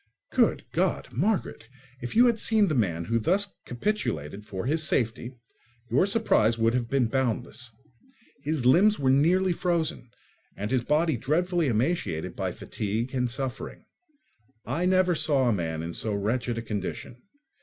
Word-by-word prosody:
Good - - +2
God! - - 0
Margaret, 190 - -1 0.3
if 120 - -5
you 240 +2 +7
had 235 -2 +2
seen 215 -3 +3
the - - 0
man 85 - 0
who 115 +4 +1
thus 190 - +1
capitulated 105 - -3
for 95 +2 -5
his 155 +5 +1
safety, 120 -3 -1 0.6
your 140 +11 +3
surprise 195 - +2
would 115 0 +2
have 120 -2 -1
been 135 -1 +2
boundless. 125 0 -2 0.7
His 150 -4 -2
limbs 195 +11 +5
were 130 -2 +2
nearly 175 +7 +3
frozen, 170 -7 -1 0.5
and 105 +3 -4
his 130 -2 +1
body 150 +1 +1
dreadfully 170 +6 0
emaciated 115 - -1
by - - -2
fatigue 110 +5 -4
and 125 -2 0
suffering. 130 +1 -5 0.8
I 155 +9 -1
never 185 -1 +3
saw 145 -5 +2
a 120 - +3
man 80 -4 -3
in 85 +1 -5
so 105 +3 -2
wretched 115 +4 -1
a 115 - -3
condition. 105 +3 -5
130 Hz, 155 wpm, -27 LUFS, 115-170 Hz, 0.8 s, you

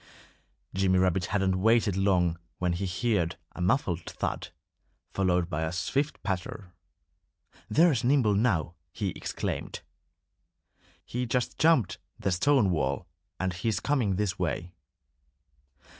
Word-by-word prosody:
Jimmy 95 -1 +2
Rabbit 90 0 +2
hadn't 95 -2 0
waited 110 -2 +3
long 90 -4 +2 0.2
when 90 -1 0
he 95 +3 -2 0.3
heard 85 -3 0 0.2
a 90 - -8
muffled 90 - 0
thud, - - -3 0.7
followed 90 -3 +2
by 80 -1 -3
a 80 0 -1
swift 140 - -1
patter. 95 -1 -4 1.0
"There's 140 0 +4
Nimble 125 -4 +3
now!" 100 -7 +1 0.2
he 100 +4 -2
exclaimed. - - -4 1.2
"He 125 +1 -3
just 125 +1 -1
jumped 130 - +3 0.2
the 95 - -1
stone 110 +2 +3
wall 70 -5 -1 0.3
and 95 -1 -1
he's 100 +4 -1
coming 125 -9 +1
this 100 -1 -1
way." 90 0 -2
95 Hz, 120 wpm, -28 LUFS, 90-115 Hz, 1.2 s, There's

